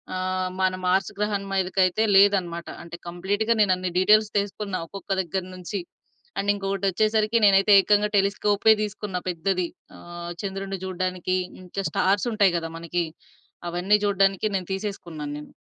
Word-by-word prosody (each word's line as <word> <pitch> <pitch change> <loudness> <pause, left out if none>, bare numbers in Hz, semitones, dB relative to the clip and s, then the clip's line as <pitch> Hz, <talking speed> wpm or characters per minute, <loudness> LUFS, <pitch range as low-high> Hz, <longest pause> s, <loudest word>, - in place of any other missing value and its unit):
ఆహ్, 185 0 -1
మన 185 0 +2
మార్స్ 190 +1 +2
గ్రహం 210 -1 -1
మీదకయితే 190 +2 +1
లేదనమాట. 185 -4 +3 0.2
అంటే 170 0 -9
కంప్లీటుగా 205 +6 0
నేనన్ని 185 -2 +1
డీటెయిల్స్ 215 +2 +4
తీసుకున్న. 200 -1 -4
ఒక్కొక్క 195 0 -9
దగ్గర 185 +1 -3
నుంచి. 185 +2 -5 0.6
అండ్ 200 +1 -1
ఇంకొకటొచ్చేసరికి, 205 +3 +1
నేనయితే 200 +1 +5
ఏకంగా 210 +1 +3
టెలిస్కోపే 205 +2 +3
దీసుకున్న 210 -2 -4
పెద్దది. 180 +1 -1 0.3
ఆహ్, 175 0 -8
చంద్రుడిని 195 -1 -4
చూడడానికి, 185 0 -2 0.3
ఇంకా 195 +2 -5
స్టార్సుంటాయి 200 -1 +2
గదా 165 -1 -4
మనకీ! 170 +1 -2 0.6
అవన్నీ 180 +4 +2
జూడడానికి 195 +1 +2
నేను 185 0 -7
తీసేసుకున్నాన్నేను. 160 -7 -6
195 Hz, 125 wpm, -24 LUFS, 180-205 Hz, 0.6 s, నేనయితే